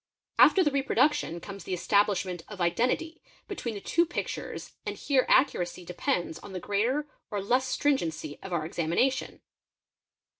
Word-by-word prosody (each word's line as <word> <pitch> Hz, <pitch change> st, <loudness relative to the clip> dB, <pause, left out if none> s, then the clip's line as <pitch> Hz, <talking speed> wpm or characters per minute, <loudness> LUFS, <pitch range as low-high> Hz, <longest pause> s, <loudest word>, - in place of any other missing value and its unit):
After 380 Hz, -, +7 dB
the 295 Hz, -, +2 dB
reproduction 275 Hz, -, +1 dB
comes 200 Hz, +1 st, -9 dB
the 185 Hz, -, -2 dB
establishment 190 Hz, -2 st, +1 dB
of 210 Hz, -3 st, -9 dB
identity 250 Hz, -, 0 dB, 0.3 s
between 240 Hz, -, -4 dB
the -, -, -4 dB
two 335 Hz, +11 st, +2 dB
pictures 345 Hz, 0 st, -5 dB
and -, -, -4 dB
here 270 Hz, -3 st, +2 dB
accuracy 180 Hz, -9 st, +2 dB
depends 170 Hz, -1 st, -2 dB
on 195 Hz, -, -11 dB
the 185 Hz, -, -3 dB
greater 235 Hz, +11 st, 0 dB, 0.2 s
or 205 Hz, -, -2 dB
less 250 Hz, +7 st, +1 dB
strin 290 Hz, +1 st, +2 dB
q -, -, -3 dB
r -, -, 0 dB
ency 155 Hz, -2 st, -6 dB
of 195 Hz, -, -8 dB
our 165 Hz, -3 st, -1 dB
examination. 170 Hz, +12 st, 0 dB
205 Hz, 160 wpm, -28 LUFS, 175-270 Hz, 0.3 s, After